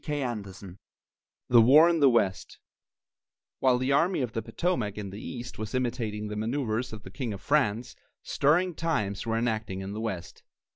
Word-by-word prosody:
CHAPTER 120 -10 -3
V 95 +1 -11 0.8
THE 120 -1 +7
WAR 145 +8 +7
IN 170 -1 +2
THE 140 -2 +6
WEST 100 -6 0 1.0
While 130 -2 +3
the 130 +2 -1
Army 165 +4 +2
of 120 - -3
the 115 - -2
Potomac 115 - -2
in 100 -2 -5
the 100 +3 -8
east 125 -2 -7
was 110 +3 -4
imitating 115 -4 -2
the 105 - -5
manoeuvres 115 +1 -2
of 110 -2 -9
the 95 - -11
King 120 0 -4
of 100 - -7
France, 120 -4 0 0.3
stirring 175 +6 +2
times 115 -12 -2
were 115 0 0
enacting 110 -4 -2
in 95 +1 -6
the 110 - -5
west. 95 -6 -5
115 Hz, 180 wpm, -28 LUFS, 105-135 Hz, 1.0 s, THE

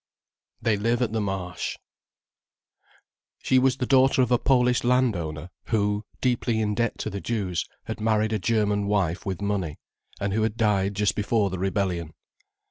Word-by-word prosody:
THEY 110 -2 +2
LIVE 115 +4 +1
AT 115 - -1
THE 110 -1 -1
MARSH 95 -4 -3 1.6
She 130 - +2
was 130 0 +2
the 125 - -1
daughter 135 0 +4
of 125 - -2
a 120 - +4
Polish 125 -2 +3
landowner 90 -11 0
who, 105 -1 0 0.2
deeply 120 -2 +1
in 105 -1 0
debt 115 +1 -1
to - - -3
the 100 0 -5
Jews, 100 -7 -2 0.2
had - - -6
married 110 0 +1
a 110 - 0
German 105 0 +1
wife 95 -4 0
with 95 0 -3
money, 95 -7 -2 0.4
and 100 -1 -1
who 110 - +1
had 110 0 -1
died 100 -3 +1
just 105 0 +2
before 105 -1 +1
the 95 - -4
rebellion. 90 -4 -1
105 Hz, 165 wpm, -25 LUFS, 95-115 Hz, 1.6 s, daughter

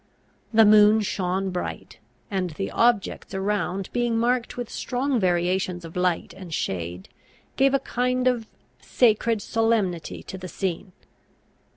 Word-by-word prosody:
The 225 -1 +6
moon 210 +1 +6
shone 190 -1 -1
bright; 180 - -5 0.3
and 185 -2 -1
the 195 +5 -5
objects 230 -5 +1
around 195 -1 -2
being 240 -2 +1
marked 240 +1 0
with 245 -2 -3
strong 255 +2 -1
variations 180 -1 0
of 165 - -11
light 180 -1 0
and 185 -3 -10
shade, 90 - -3 0.5
gave 275 0 +3
a - - +3
kind 250 0 0
of 240 -3 +1 0.3
sacred 225 -2 +2
solemnity 220 -7 0
to 190 - -8
the 185 - -7
scene. 185 0 -4
205 Hz, 135 wpm, -24 LUFS, 180-235 Hz, 0.5 s, The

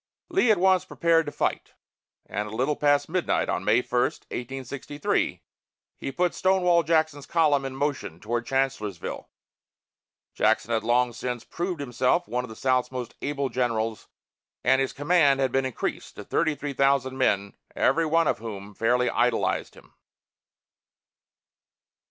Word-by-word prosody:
Lee 340 -8 +2
at 215 - +5
once 185 0 +4
prepared 165 -3 +2
to - - -3
fight, - - -2 0.5
and 105 +2 -3
a 105 - -7
little 135 +5 +1
past 145 -1 +2
midnight 180 +2 0
on 90 - -1
May 110 +5 +3
1, 120 0 0
1863, 135 +4 -3 0.5
he 135 - -5
put 180 +5 0
Stonewall 180 -2 +3
Jackson's 155 -3 0
column 150 -5 +2
in 135 0 -5
motion 135 - -3
toward 115 +3 -3
Chancellorsville. 130 -9 -2 1.0
Jackson 120 - +1
had 110 -1 +1
long 120 +1 +2
since 125 0 -4
proved 175 -1 -4
himself 135 +5 0
one 125 +1 -2
of 125 - -8
the 110 - -9
South's 130 0 +1
most 125 -2 -5
able 140 -2 -2
generals, 115 -3 -1 0.6
and 130 +1 +4
his 135 - -1
command 145 -2 +3
had 135 -2 +1
been 135 +1 +1
increased 130 - -4
to - - -8
thirty 155 -2 0
three 145 0 -5
thousand 135 -1 +2
men, 100 -5 +1 0.2
every 165 0 +2
one 165 +1 +3
of - - 0
whom 105 -2 -7
fairly 125 +4 +1
idolized - - 0
him. - - -18
135 Hz, 150 wpm, -26 LUFS, 120-155 Hz, 1.0 s, at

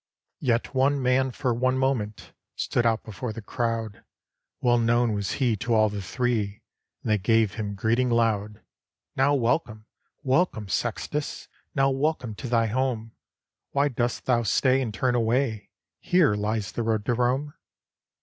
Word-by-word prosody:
283 130 - +2
ROME - - +6
Yet 120 - -5 0.2
one 140 - -2
man 130 +1 +2
for 125 0 -1
one 130 +2 +1
moment 125 -6 -2 0.2
Stood 120 -1 0
out 115 -1 +1
before 110 +2 -5
the 115 - -7
crowd; 115 -2 -3 0.6
Well 120 -1 +3
known 120 0 +2
was 100 -1 -2
he 125 -5 +1
to 115 +3 0
all 110 -1 +4
the 105 -1 -5
Three, 105 0 -2 0.4
And 110 - -1
they 105 - +3
gave 110 0 +2
him 105 -2 -4
greeting 115 +5 +1
loud, 110 -3 0 0.5
"Now 140 +2 +3
welcome, 115 -4 0 0.4
welcome, 130 - +1
Sextus! 150 - -3 0.3
Now 135 0 +3
welcome 135 -4 -1
to 125 +5 -7
thy 115 -1 +3
home! 115 -1 -1 0.6
Why 140 +1 +2
dost 120 -2 -2
thou 120 -2 +3
stay, 130 +3 +2
and 120 -4 -2
turn 125 +5 0
away? 115 -1 0 0.3
Here 175 - +3
lies 105 -1 -2
the - - -3
road 110 -2 0
to 120 - +1
Rome." 130 +5 0
120 Hz, 160 wpm, -26 LUFS, 110-130 Hz, 0.6 s, ROME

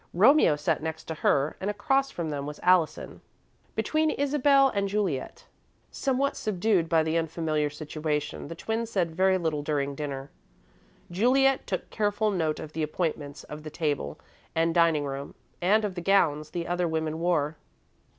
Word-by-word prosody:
Romeo 225 - +6
sat 145 +1 -1
next 160 0 -4
to 160 - -5
her 145 -1 +1
and 195 - -2
across 270 +7 +1
from 165 - -4
them 140 -1 -4
was 150 - -7
Allison, 180 -3 +2 0.5
between 310 0 +1
Isabel 280 -1 +3
and 200 -4 -1
Juliet. 200 - -2 0.5
Somewhat 275 0 0
subdued 195 -4 0
by 160 -1 +4
the 160 +1 +1
unfamiliar 160 -2 -1
situation, 150 0 -3
the 165 - -7
twins 225 +5 -3
said 175 -7 -1
very 190 +1 +3
little 160 -4 -1
during 145 -2 -1
dinner. 140 -1 -5 0.8
Juliet 260 +8 +3
took - - -3
careful 210 0 +1
note 160 -5 -1
of 155 0 -8
the 160 - -3
appointments 155 -2 -3
of 150 +1 -9
the 155 - -7
table 145 - -2 0.4
and 165 0 +2
dining 165 -4 +3
room, 140 0 -6 0.3
and 210 +5 +3
of 200 - -3
the 175 - -5
gowns 155 -5 +2
the 170 -1 -4
other 175 0 0
women 160 -1 -2
wore. 160 -3 0
165 Hz, 160 wpm, -27 LUFS, 150-205 Hz, 0.8 s, Romeo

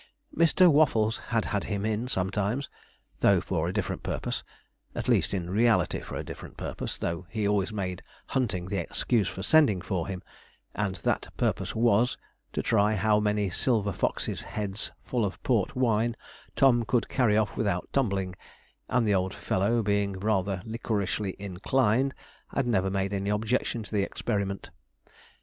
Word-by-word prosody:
Mr. 170 +3 +5
Waffles 125 -8 +3
had 115 -2 +1
had 100 - -1
him 100 -1 -2
in 110 +2 -1
sometimes, 105 +5 -1 0.5
though - - +5
for - - -1
a - - -1
different - - -2
purpose - - -3 0.5
at - - -3
least, - - +3
in 90 -4 -2
reality 110 +5 +2
for - - -8
a - - -3
different - - -9
purpose, - - -4
though 85 +2 -3
he 105 0 -1
always 100 0 +1
made 95 -4 -3 0.2
hunting 105 -9 -1
the 100 -1 -1
excuse 110 -6 0
for 95 - -5
sending 140 -6 +5
for 90 -2 -2
him, 95 -1 -5 0.5
and 105 -3 -1
that - - -1
purpose - - -1
was, 115 +2 +3 0.3
to - - -2
try 105 +2 +3
how 105 +2 +3
many 105 -1 +1
silver 105 0 +1
foxes' - - -1
heads 105 -1 -3
full 120 -3 -1
of 100 -2 -2
port 115 -7 +1
wine 115 -2 +2 0.4
Tom 125 -3 +5
could 115 +2 +1
carry 115 -6 +2
off 110 -2 +1
without 100 -5 -1
tumbling, 100 -8 0 0.6
and 125 -2 +2
the 105 - +3
old 95 0 0
fellow 110 +5 +1
being 100 -1 +1
rather 95 -1 0
liquorishly 105 -3 -2
inclined, 115 +6 +1 0.3
had 140 - -1
never 95 -5 +2
made 95 +1 -1
any 100 0 -1
objection 110 +2 0
to - - -11
the 105 -2 +2
experiment. 100 -1 -2
105 Hz, 160 wpm, -28 LUFS, 95-115 Hz, 0.6 s, Mr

